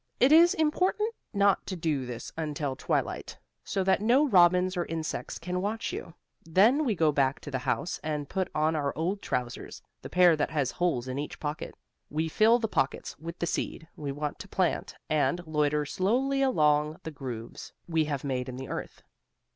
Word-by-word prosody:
It 260 Hz, +3 st, +5 dB
is 340 Hz, +4 st, +7 dB
important 370 Hz, +7 st, +1 dB, 0.2 s
not 200 Hz, -1 st, +2 dB
to 190 Hz, -, -3 dB
do 155 Hz, -6 st, -1 dB
this 120 Hz, -1 st, -6 dB
until 150 Hz, -3 st, -3 dB
twilight, -, -, -2 dB, 0.3 s
so 195 Hz, -, -1 dB
that 190 Hz, +1 st, +2 dB
no 255 Hz, +7 st, +4 dB
robins 180 Hz, -3 st, +5 dB
or 175 Hz, -1 st, -1 dB
insects 160 Hz, -1 st, -4 dB
can 180 Hz, +2 st, -3 dB
watch 205 Hz, -3 st, -2 dB
you. 165 Hz, -, -7 dB, 0.3 s
Then 215 Hz, -, +4 dB
we 225 Hz, -5 st, +1 dB
go 160 Hz, -3 st, +3 dB
back 140 Hz, -1 st, 0 dB
in 145 Hz, -, -6 dB
the 130 Hz, -, -1 dB
house 160 Hz, +7 st, -2 dB
and 150 Hz, -2 st, -2 dB
put 190 Hz, +2 st, -1 dB
on 155 Hz, +1 st, +2 dB
our 145 Hz, -2 st, -1 dB
old 185 Hz, +5 st, -1 dB
trousers, 125 Hz, -1 st, -4 dB, 0.2 s
the -, -, -8 dB
pair 180 Hz, -2 st, +5 dB
that 145 Hz, -, 0 dB
has 145 Hz, -4 st, 0 dB
holes 165 Hz, -9 st, 0 dB
in 130 Hz, +2 st, -3 dB
each 145 Hz, -, -5 dB
pocket. 150 Hz, 0 st, -4 dB, 0.3 s
We 160 Hz, +2 st, -1 dB
fill 220 Hz, +7 st, +5 dB
the 230 Hz, -2 st, -1 dB
pockets 135 Hz, -9 st, -1 dB
with 165 Hz, +2 st, -7 dB
the -, -, -1 dB
seed, 160 Hz, -1 st, -3 dB
we 145 Hz, -2 st, -4 dB
want 145 Hz, +1 st, -4 dB
to -, -, -8 dB
plant -, -, -1 dB
and 175 Hz, +3 st, +1 dB
loiter 150 Hz, -1 st, +1 dB
slowly 255 Hz, -, +1 dB
along 150 Hz, -, +2 dB
the 160 Hz, -, -5 dB
grooves 125 Hz, -6 st, -7 dB, 0.2 s
we 160 Hz, -2 st, +1 dB
have 145 Hz, -3 st, -3 dB
made 130 Hz, -2 st, -2 dB
in 125 Hz, -, -6 dB
the 130 Hz, +1 st, -7 dB
earth. -, -, -6 dB
160 Hz, 190 wpm, -28 LUFS, 145-195 Hz, 0.3 s, is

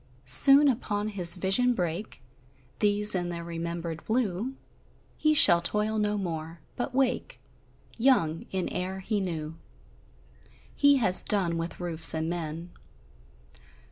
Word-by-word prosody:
Soon 275 Hz, -, +8 dB
upon 215 Hz, -5 st, -3 dB
his 185 Hz, -4 st, -1 dB
vision 195 Hz, +7 st, +1 dB
break 175 Hz, -, -6 dB, 0.6 s
These, 210 Hz, 0 st, +1 dB
in 175 Hz, -2 st, -3 dB
their 170 Hz, -1 st, -7 dB
remembered 170 Hz, -1 st, -7 dB
blue; 225 Hz, +1 st, -3 dB, 0.6 s
He 310 Hz, 0 st, 0 dB
shall 170 Hz, -11 st, +7 dB
toil 210 Hz, +5 st, -2 dB
no 210 Hz, 0 st, -2 dB
more, 165 Hz, -3 st, -7 dB, 0.2 s
but 245 Hz, +1 st, -6 dB
wake 270 Hz, -, -2 dB, 0.6 s
Young, 195 Hz, -, 0 dB
in 190 Hz, -1 st, -4 dB
air 190 Hz, +1 st, -6 dB
he 210 Hz, +2 st, -3 dB
knew. 165 Hz, -4 st, -6 dB, 1.2 s
He 285 Hz, 0 st, +3 dB
has 185 Hz, -7 st, +6 dB
done 185 Hz, -5 st, -1 dB
with 165 Hz, +1 st, -6 dB
roofs 165 Hz, -2 st, +1 dB
and 160 Hz, 0 st, -3 dB
men. 170 Hz, 0 st, -7 dB
185 Hz, 125 wpm, -26 LUFS, 170-220 Hz, 1.2 s, Soon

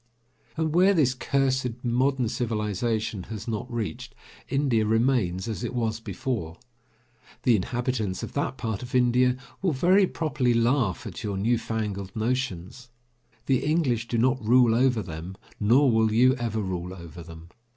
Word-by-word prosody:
And 160 Hz, -1 st, 0 dB
where 190 Hz, +3 st, +5 dB
this 135 Hz, -6 st, +3 dB
cursed 130 Hz, -2 st, -1 dB
modern 130 Hz, +1 st, +1 dB
civilization 110 Hz, -3 st, -2 dB
has 110 Hz, 0 st, -7 dB
not 115 Hz, +2 st, -4 dB
reached, 120 Hz, +2 st, -5 dB, 0.3 s
India 135 Hz, -6 st, +2 dB
remains 110 Hz, -4 st, +1 dB
as 110 Hz, -5 st, -4 dB
it -, -, -4 dB
was 110 Hz, -2 st, -1 dB
before. 100 Hz, -5 st, -4 dB, 0.9 s
The 120 Hz, -, +5 dB
inhabitants 115 Hz, -1 st, -2 dB
of -, -, -6 dB
that 140 Hz, -2 st, -2 dB
part 110 Hz, -4 st, -3 dB
of 125 Hz, +1 st, -6 dB
India 125 Hz, 0 st, +3 dB, 0.2 s
will 185 Hz, -4 st, +1 dB
very 185 Hz, +8 st, +4 dB
properly 140 Hz, -8 st, 0 dB
laugh 115 Hz, -4 st, +1 dB
at 105 Hz, 0 st, -7 dB
your 100 Hz, -2 st, -2 dB
new 115 Hz, +4 st, +1 dB
fangled 100 Hz, -4 st, -4 dB
notions. 125 Hz, -1 st, -3 dB, 0.6 s
The 130 Hz, -2 st, +1 dB
English 140 Hz, -7 st, +1 dB
do 115 Hz, -, -1 dB
not 130 Hz, +1 st, +2 dB
rule 120 Hz, +1 st, +5 dB
over 125 Hz, -2 st, +2 dB
them 85 Hz, +2 st, -8 dB, 0.2 s
nor 125 Hz, +6 st, +4 dB
will 110 Hz, -1 st, +3 dB
you 125 Hz, +4 st, +5 dB
ever 115 Hz, -2 st, -2 dB
rule 90 Hz, -1 st, -4 dB
over 85 Hz, -1 st, -10 dB
them. 80 Hz, 0 st, -12 dB
120 Hz, 150 wpm, -26 LUFS, 105-130 Hz, 0.9 s, where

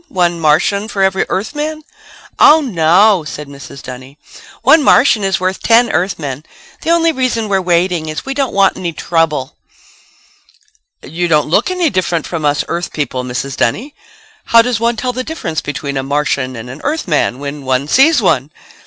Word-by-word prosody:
One 175 Hz, -8 st, 0 dB
Martian 165 Hz, +7 st, +1 dB
for 195 Hz, -3 st, -1 dB
every 190 Hz, 0 st, +1 dB
Earthman?" 300 Hz, +9 st, -3 dB, 0.6 s
"Oh, 310 Hz, +2 st, +7 dB
no," 190 Hz, -, +3 dB
said 150 Hz, -1 st, -7 dB
Mrs. 140 Hz, -1 st, -11 dB
Dunny, 130 Hz, +2 st, -10 dB, 0.5 s
"one 315 Hz, -, +6 dB
Martian 245 Hz, -6 st, +4 dB
is 195 Hz, -1 st, 0 dB
worth 185 Hz, +1 st, -2 dB
ten 235 Hz, 0 st, +3 dB
Earthmen. 160 Hz, -6 st, -2 dB, 0.4 s
The -, -, -4 dB
only 335 Hz, -1 st, +3 dB
reason 255 Hz, -6 st, -1 dB
we're 195 Hz, -2 st, +1 dB
waiting 175 Hz, -2 st, 0 dB
is 155 Hz, -, -5 dB
we 270 Hz, -, -3 dB
don't 270 Hz, -2 st, -1 dB
want 195 Hz, -1 st, +2 dB
any 175 Hz, -2 st, -4 dB
trouble." 160 Hz, -4 st, -1 dB, 1.5 s
"You 175 Hz, +2 st, -3 dB
don't 150 Hz, -3 st, +2 dB
look 205 Hz, -, +2 dB
any 365 Hz, -3 st, 0 dB
different 175 Hz, -4 st, -1 dB
from 165 Hz, -3 st, -4 dB
us 145 Hz, 0 st, +1 dB
Earth 175 Hz, +1 st, -4 dB
people, 135 Hz, -4 st, -3 dB
Mrs. 125 Hz, +2 st, -4 dB
Dunny. 240 Hz, -, -1 dB, 0.5 s
How 230 Hz, 0 st, +5 dB
does 245 Hz, -2 st, -1 dB
one 235 Hz, +1 st, +1 dB
tell 250 Hz, +2 st, -3 dB
the 255 Hz, +1 st, -3 dB
difference 175 Hz, -, -4 dB
between 140 Hz, -1 st, -4 dB
a -, -, 0 dB
Martian 140 Hz, -2 st, -1 dB
and 115 Hz, +1 st, -8 dB
an 130 Hz, +5 st, -9 dB
Earthman 195 Hz, -, -1 dB
when 140 Hz, +1 st, -6 dB
one 130 Hz, +1 st, -1 dB
sees 270 Hz, -, +4 dB
one?" 135 Hz, -6 st, +1 dB
175 Hz, 170 wpm, -15 LUFS, 145-230 Hz, 1.5 s, Oh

